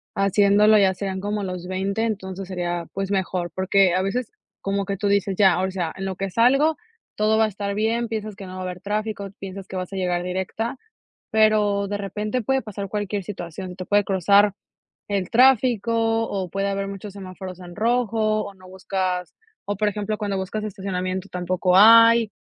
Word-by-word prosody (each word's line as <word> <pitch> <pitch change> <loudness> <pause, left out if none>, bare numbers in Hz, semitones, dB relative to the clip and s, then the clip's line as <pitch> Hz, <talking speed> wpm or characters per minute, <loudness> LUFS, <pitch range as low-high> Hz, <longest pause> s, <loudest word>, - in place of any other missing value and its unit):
haciéndolo, 205 +2 +4
ya 195 -2 +4
serían 190 0 -4
como 205 0 -2
los 180 -2 -5
20. 195 +3 -1
Entonces, 195 -4 -4
sería, 175 -2 -3
pues, 195 0 -3
mejor, 185 -2 -1
porque 190 -1 +3
a 185 - +2
veces, 215 +5 -2 0.3
como 195 0 -1
que 195 0 -3
tú 205 - -1
dices: 200 -1 +1
"Ya, 190 -4 +5
o 190 - 0
sea, 175 -4 -3
en 190 - -5
lo 190 -1 -3
que 195 +1 -3
salgo, 275 - +3 0.4
todo 215 +1 +2
va 220 - +4
a - - 0
estar 200 0 -4
bien". 225 +3 0
Piensas 215 -2 -4
que 195 - -9
no 185 - -9
va 185 - -7
a - - -4
haber 180 -1 -6
tráfico, 210 0 -3
piensas 195 0 -8
que - - -8
vas 185 +1 -4
a - - -4
llegar 180 -2 -1
directa, 190 +7 -3 0.5
pero 210 -2 +3
de 205 0 -2
repente 210 +4 -3
puede 265 +4 +1
pasar 200 -2 -6
cualquier 205 -1 -3
situación, 180 -1 -7
te 185 0 -7
puede 205 0 +3
cruzar 200 +2 +4 0.6
el 195 -3 -1
tráfico 240 -3 +4 0.4
o 190 -2 -3
puede 195 +2 -2
haber 195 0 -2
muchos 200 0 -7
semáforos 185 -2 -8
en 175 -1 -10
rojo, 220 -1 +1
o 200 - -9
no 185 -1 -16
buscas 185 -1 -3 0.3
o, 205 - -3
por 210 +2 +1
ejemplo, 210 +1 -2
cuando 205 -2 -2
buscas 190 +3 -3
estacionamiento, 190 -2 -3
tampoco 180 0 0
hay, 230 +2 +7
200 Hz, 195 wpm, -23 LUFS, 185-215 Hz, 0.6 s, hay